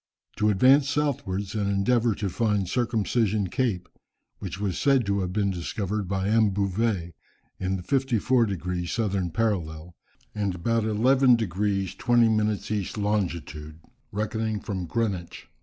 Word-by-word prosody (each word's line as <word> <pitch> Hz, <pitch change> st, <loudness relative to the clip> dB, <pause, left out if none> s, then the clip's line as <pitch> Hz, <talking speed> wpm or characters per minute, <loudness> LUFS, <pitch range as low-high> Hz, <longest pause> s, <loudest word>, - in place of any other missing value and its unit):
To 105 Hz, -, +2 dB
advance 135 Hz, +7 st, +5 dB
southwards 100 Hz, -10 st, -1 dB
and 105 Hz, -2 st, -1 dB
endeavour 115 Hz, +3 st, +2 dB
to 105 Hz, -, -2 dB
find 105 Hz, -1 st, 0 dB
Circumcision 110 Hz, -2 st, 0 dB
Cape, 115 Hz, -9 st, -1 dB, 0.5 s
which 95 Hz, -1 st, -6 dB
was 100 Hz, -3 st, -2 dB
said 135 Hz, -4 st, +3 dB
to 100 Hz, 0 st, 0 dB
have 90 Hz, -2 st, -2 dB
been 100 Hz, 0 st, 0 dB
discovered 100 Hz, +3 st, -3 dB
by 95 Hz, +1 st, -1 dB
M. 110 Hz, 0 st, +4 dB
Bouvet, 100 Hz, -2 st, -1 dB, 0.5 s
in 95 Hz, +1 st, -1 dB
the 90 Hz, -, -8 dB
54 125 Hz, 0 st, +2 dB
degrees 90 Hz, -2 st, -3 dB
southern 100 Hz, -5 st, -1 dB
parallel, 85 Hz, -4 st, -2 dB, 0.4 s
and 100 Hz, -3 st, -2 dB
about 115 Hz, +5 st, 0 dB
11 125 Hz, +4 st, +4 dB
degrees 100 Hz, -2 st, -1 dB
20 120 Hz, +1 st, +3 dB
minutes 110 Hz, -1 st, 0 dB
east 105 Hz, -1 st, -2 dB
longitude, 85 Hz, -7 st, -2 dB, 0.3 s
reckoning 110 Hz, +1 st, -2 dB
from 95 Hz, -3 st, -4 dB
Greenwich. 95 Hz, -3 st, -3 dB
105 Hz, 140 wpm, -26 LUFS, 95-115 Hz, 0.5 s, advance